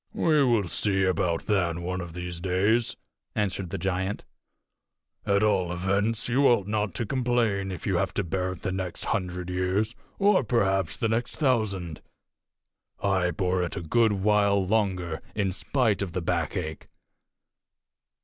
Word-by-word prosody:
"We 155 -3 +3
will 115 -7 +2
see 95 +2 +1
about 90 -2 +1
that 90 -6 +1
one 90 +2 -3
of 85 -2 -8
these 90 0 -5
days," 100 +6 +1 0.4
answered 95 -3 -1
the - - -3
giant. 95 +1 -2 1.0
"At 100 0 +3
all 95 -5 +2
events, 100 +5 0
you 135 +4 +4
ought 115 -6 +3
not 105 -2 -1
to 115 - -1
complain 115 -6 0
if 90 - -7
you - - +1
have - - 0
to - - +1
bear 90 +1 -2
it 90 - -13
the 95 - -1
next 95 -2 -4
hundred 90 -3 -2
years, 95 +5 0 0.2
or 200 -5 +4
perhaps 95 -7 +1
the 115 - 0
next 115 +2 -1
thousand. 105 - 0 1.0
I 95 -3 +2
bore 90 +1 0
it 90 - -2
a - - -3
good 110 +7 +3
while 100 -1 +2
longer, 95 -5 0
in 100 -3 0
spite 115 0 0
of 95 -4 -3
the 90 - -2
backache. 80 -1 -2
95 Hz, 155 wpm, -27 LUFS, 90-110 Hz, 1.0 s, you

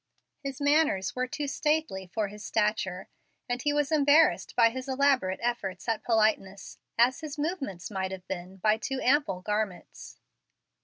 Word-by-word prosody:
His 275 -2 -6
manners 285 -11 +2
were 255 0 -1
too 290 +2 -4
stately 300 -10 -1
for 215 -2 -1
his 210 +1 -10
stature, 210 -4 -1 0.4
and 245 0 -2
he 295 - +1
was 290 0 0
embarrassed 300 +1 +4
by 230 - +5
his 260 +2 -6
elaborate 265 -8 +2
efforts 195 -6 -3
at 225 -2 0
politeness 215 -4 0 0.2
as 245 +5 +4
his 310 -2 -7
movements 280 - -3
might 190 -1 -2
have 185 -1 -8
been 185 0 -6
by 215 +3 +2
too 265 +4 -3
ample 250 -9 +2
garments. 210 -3 -4
230 Hz, 155 wpm, -28 LUFS, 190-285 Hz, 0.4 s, by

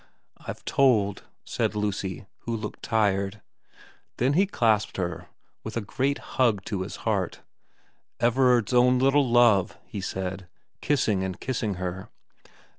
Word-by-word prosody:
* - - -37
I've - - -7
told,' 110 -8 +2 0.2
said - - -1
Lucy, 100 -3 -3
who 115 - -4
looked 105 - -7
tired. 100 -2 0 0.8
Then 130 +4 +2
he 190 +6 +3
clasped 110 - +1
her 90 -2 -3 0.4
with 110 +1 -5
a - - 0
great 135 +7 -1
hug 115 -7 0
to 100 -3 -3
his 95 - -5
heart. 100 -6 -1 0.4
' - - -42
Everard's 125 -2 +3
own 125 +1 +5
little 135 +1 +3
love,' 115 -5 +4
he 100 - -6
said, 95 -1 -4 0.3
kissing 110 -10 +1
and 95 -1 -4
kissing 110 -6 -2
her. 90 +1 -5
105 Hz, 140 wpm, -26 LUFS, 95-125 Hz, 0.8 s, own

